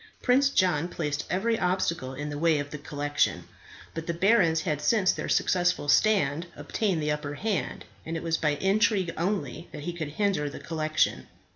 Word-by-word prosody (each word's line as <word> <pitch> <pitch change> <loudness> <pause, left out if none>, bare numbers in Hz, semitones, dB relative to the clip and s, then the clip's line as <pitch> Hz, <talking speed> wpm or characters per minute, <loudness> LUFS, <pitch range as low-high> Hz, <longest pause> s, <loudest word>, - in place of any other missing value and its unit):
Prince 275 +2 +4
John 175 - +2
placed 150 -4 -3
every 225 +5 0
obstacle 170 -7 -1
in 145 +2 -5
the 145 - -4
way 165 -1 +3
of 145 0 -4
the 150 - -6
collection; 145 0 -1 0.5
but 165 0 -6
the 170 - -1
barons 170 -4 +3
had 150 -5 -2
since 200 +1 +3
their - - -4
successful 180 -5 +1
stand 165 -2 +3
obtained 190 -8 -1
the 150 - +1
upper 150 -1 -3
hand, 205 +4 -2 0.2
and 165 +1 -4
it - - -6
was 165 -1 +1
by 150 -2 +1
intrigue 190 0 +2
only 175 -1 -2
that 145 - -8
he 175 - -3
could 155 -4 -5
hinder 190 -7 0
the - - -8
collection. 155 -1 -1
165 Hz, 180 wpm, -27 LUFS, 150-190 Hz, 0.5 s, Prince